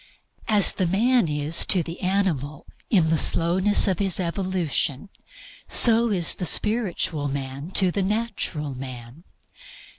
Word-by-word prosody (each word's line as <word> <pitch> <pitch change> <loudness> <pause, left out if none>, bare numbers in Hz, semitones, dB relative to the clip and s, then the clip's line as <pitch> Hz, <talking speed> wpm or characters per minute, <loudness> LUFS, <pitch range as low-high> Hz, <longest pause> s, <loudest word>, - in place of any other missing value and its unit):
As 210 -3 +4
the 185 - -2
man 230 +3 +1
is 150 +2 +1
to 180 -3 +2
the 165 +2 -9
animal 175 -7 -2 0.2
in 165 -6 +2
the 160 - +1
slowness 185 +6 +2
of 185 -3 -1
his 195 -3 +2
evolution, 180 -3 -2 0.6
so 230 0 +4
is 180 -6 +1
the 180 - -4
spiritual 180 -9 0
man 135 +1 -6
to 185 -2 +3
the 200 - -2
natural 190 -8 -3
man. 130 +3 -10
175 Hz, 130 wpm, -23 LUFS, 150-200 Hz, 0.6 s, As